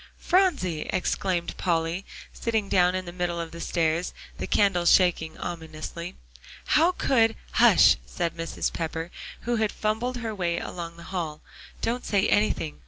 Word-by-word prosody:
"Phronsie!" 295 - +1
exclaimed 180 -1 -1
Polly, 170 +1 -1 0.3
sitting 220 -3 -1
down 180 -1 +4
on 185 0 -3
the 175 - -6
middle 175 -1 -2
of 165 -1 -4
the 170 - -8
stairs, 165 +1 0 0.2
the - - -3
candle 180 -4 +2
shaking 170 -4 +3
ominously, 165 +1 -6 0.6
"how 335 +4 +5
could" 225 -9 +2 0.2
"Hush!" - - +6
said 60 - -2
Mrs. 165 0 -3
Pepper, 165 +1 -4 0.3
who 240 0 -1
had 220 -1 +1
fumbled 225 +4 -1
her 225 -2 -4
way 175 -4 -1
along 170 -1 -6
the 170 - -11
hall. 160 -4 -3 0.4
"Don't 245 +2 -1
say 200 -2 +2
anything. 205 -7 +1
180 Hz, 150 wpm, -26 LUFS, 165-215 Hz, 0.6 s, Hush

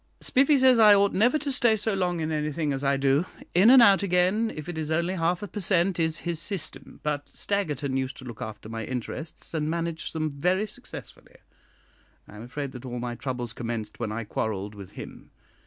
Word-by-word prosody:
Spiffy 275 +3 +3
says 260 -2 +5
I 210 -2 +8
ought 200 0 +3
never 240 +9 +3
to 290 -2 -3
stay 235 -4 +3
so 215 +1 -1
long 180 -3 0
in 160 0 -2
anything 150 -1 -1
as 135 +1 -3
I 140 0 +2
do; 140 +5 +2 0.3
in 190 +6 +6
and 255 -1 +9
out 200 -3 +6
again, 195 +4 +2
if 155 -1 -7
it 175 - -5
is 155 -1 -3
only 170 +3 0
half 175 +1 0
a - - -4
per 205 - -6
cent, 180 -1 +2
is 160 0 0
his 170 -2 -2
system; 170 -2 -5
but 145 -1 -2
Staggerton 150 -9 -2
used 130 0 -2
to 130 - -10
look 120 -3 -9
after 110 -1 -7
my 115 0 -5
interests, 130 +9 -6
and 155 -1 -1
managed 165 0 -3
them 155 -1 -1
very 180 +8 +1
successfully. 210 - -12 0.9
I - - -13
am 105 - -9
afraid 135 +3 -5
that 125 -1 -9
all 125 -1 -5
my 120 0 -3
troubles 120 -2 -4
commenced 115 -3 -5
when 115 -3 -2
I 115 +2 -3
quarrelled 105 -1 -3
with 100 -3 -11
him. - - -10
160 Hz, 210 wpm, -26 LUFS, 130-195 Hz, 0.9 s, and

